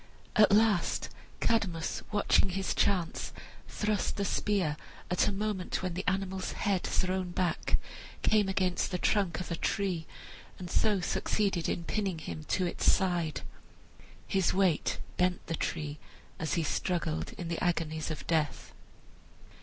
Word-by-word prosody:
At 215 -3 +6
last 210 -4 +3 0.3
Cadmus, 185 -8 +1
watching 205 -2 +3
his 190 +1 -1
chance, 180 -5 +1 0.4
thrust 210 -2 -1
the 200 - -1
spear 190 -6 +1 0.4
at 180 - +3
a - - +2
moment 200 -2 -2
when 185 -2 -1
the 185 +3 -4
animal's 190 -1 -1
head 195 -3 +1
thrown 185 0 0
back 175 0 0 0.5
came 210 -2 +4
against 185 -2 +1
the 180 - -1
trunk 180 -3 +1
of 180 - -5
a - - +1
tree, 180 -3 -1 0.5
and 180 -1 -7
so 210 -4 +3
succeeded 195 -2 0
in 170 - -1
pinning 195 -1 -1
him 85 - -6
to 185 - +1
its 175 - +3
side. 175 -6 0 0.9
His 190 -2 +2
weight 185 -5 +2 0.2
bent 180 0 +1
the - - -3
tree 150 -2 -3 0.4
as 160 - -1
he 170 - +1
struggled 165 0 -1
in 175 - -6
the 170 0 -2
agonies 160 -3 0
of 155 -3 -5
death. 155 -4 0
185 Hz, 145 wpm, -31 LUFS, 170-195 Hz, 0.9 s, At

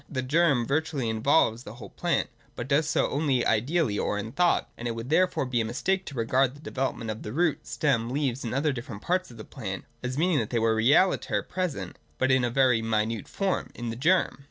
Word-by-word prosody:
The 130 -2 -3
germ 140 -3 +2
virtually 145 -3 -1
involves 115 0 +2
the 110 -2 -10
whole 110 -5 -11
plant, - - 0 0.3
but 120 - -5
does 150 +3 +2
so - - +2
only 140 -4 +1
ideally 120 0 +1
or 105 - -1
in 105 +2 -4
thought: 175 +5 +2
and 120 - -5
it 115 - -2
would 115 +4 -6
therefore 180 -3 +2
be 125 -2 0
a - - 0
mistake 185 +12 -1
to 145 - -8
regard 130 +3 +1
the - - -14
development 130 -6 -3
of 110 - -7
the 105 - -6
root, 155 -2 0
stem, 120 -1 0
leaves, 135 -1 -1
and 115 - -3
other 145 +3 +1
different 115 -4 -7
parts 185 +1 0
of 120 - -13
the 110 - -8
plant, 100 -8 -6 0.2
as 125 +1 -4
meaning 165 -1 +2
that 110 - -2
they 120 - -1
were 115 0 +2
realiter 140 +12 +3
pre 185 0 -1
sent, 145 - -8 0.2
but 130 0 +2
in 130 -1 +3
a 120 - +1
very 125 -2 +3
minute 110 -1 -1
form, 195 -2 -2
in 120 -1 -4
the - - -5
germ. 170 +8 +2
130 Hz, 230 wpm, -27 LUFS, 115-150 Hz, 0.3 s, realiter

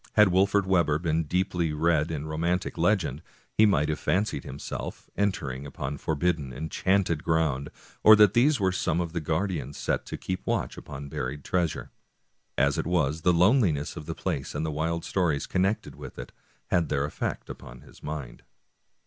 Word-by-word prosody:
Had 105 -2 +6
Wolfert 100 +2 +3
Webber 85 -6 +3
been 80 -1 0
deeply 90 -1 0
read 80 0 +2
in 75 -2 -3
romantic 85 +4 -1
legend - - +1 0.3
he 110 - +5
might 75 -7 +2
have 75 -2 -2
fancied 100 -5 0
himself 70 +3 -7
entering 80 -10 -1
upon 70 0 -5
forbidden, 80 -3 -1
en 75 +6 -5
chanted 95 -5 +1
ground, 75 -4 +1 0.3
or 110 - +9
that 105 -2 +6
these 135 +4 +4
were 95 -2 +2
some 85 -2 0
of 85 -2 -3
the 85 - -2
guardians 80 -1 -2
set - - -1
to - - -5
keep 95 0 -4
watch - - -1
upon 70 +1 -8
buried 70 +1 -4
treasure. 85 -5 -1 0.7
As 70 +1 +2
it - - -2
was, 80 -3 +1
the 90 - +4
loneliness 90 - +3
of 75 - -8
the - - -4
place, 70 +1 -3
and 80 +2 -1
the 80 - -2
wild 80 +2 -2
stories 85 -7 0
connected 95 +4 0
with - - -10
it, - - -7 0.4
had 85 -4 +2
their 70 +1 0
efifect - - -4
upon 65 -1 -10
his - - -17
mind. 75 -5 -6
80 Hz, 175 wpm, -27 LUFS, 75-95 Hz, 0.7 s, or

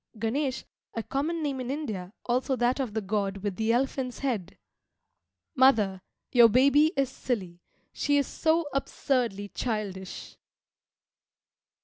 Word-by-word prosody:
[Ganesh, 260 +5 -1 0.3
a 230 - -2
common 310 +6 -2
name 280 -3 -2
in 250 -1 -4
India, 215 -11 -4
also 255 +2 +1
that 245 +2 +1
of 245 -6 -3
the 220 - 0
god 200 -1 -1
with 205 -3 -2
the 220 +2 +1
elephant's 255 0 0
head.] 225 -10 -3 1.0
Mother, 220 - +4 0.3
your 240 -2 +7
baby 280 +6 +5
is 275 -1 +3
silly, 200 -9 -4 0.3
she 290 0 +1
is 280 - +2
so 320 +4 +1
absurdly 245 -7 -1
childish! 200 -6 -4
245 Hz, 125 wpm, -28 LUFS, 210-275 Hz, 1.0 s, your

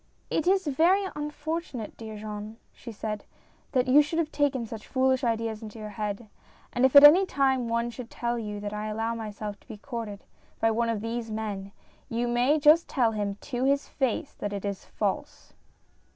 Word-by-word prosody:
"It 320 - 0
is 385 0 +3
very 340 +8 +3
unfortunate, 300 -4 -4
dear 220 -1 -8
Jean," 210 +1 -7 0.2
she 235 - -9
said, 210 -1 -4 0.5
"that 255 -1 +2
you 275 +4 +7
should 295 +3 -2
have 325 -2 0
taken 275 -5 +1
such 220 -1 -8
foolish 260 0 +2
ideas 225 -2 -1
into 220 0 -9
your 215 -1 -6
head; 210 +2 -4 0.5
and 245 +2 +3
if 265 - -7
at 280 - +11
any 315 +7 +10
time 275 -7 +2
any 235 - -4
one 235 +1 0
should 240 -1 -8
tell 240 0 -2
you 210 -2 -5
that 205 0 -4
I 210 0 -3
allow 225 +2 -1
myself 210 -2 -6
to - - -27
be 220 - -8
courted 225 -4 -6 0.4
by 225 - +3
one 230 +1 +1
of 220 -3 -1
these 230 +1 -3
men, 210 -3 -4 0.4
you 235 +1 -1
may 245 +5 +3
just 305 +3 +6
tell 240 -5 +2
him, 205 -2 -2
to 250 -3 -3
his 280 +1 +2
face, 270 +3 -1
that 205 0 -3
it 200 0 -4
is 200 -1 -4
false." - - -3
235 Hz, 195 wpm, -27 LUFS, 215-275 Hz, 0.5 s, at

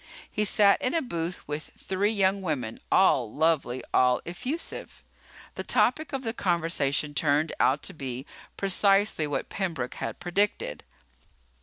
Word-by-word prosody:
He 210 - 0
sat 200 -1 +4
in 255 - 0
a 330 - +2
booth 170 -6 -4
with 150 +1 -5
three 195 +2 0
young 195 -2 +2
women, 135 -11 -3
all 130 - +4
lovely, 150 -5 +1
all 125 -1 +4
effusive. 255 - -5 0.5
The - - -5
topic 310 -2 +2
of 270 -1 -3
the 225 -2 -2
conversation 160 -6 0
turned 150 +1 +1
out 140 +3 +3
to 195 - -3
be 135 -4 -6 0.3
precisely 195 -3 +3
what 145 - -3
Pembroke 165 -11 -3
had - - -4
predicted. 205 - -1
170 Hz, 140 wpm, -27 LUFS, 145-200 Hz, 0.5 s, sat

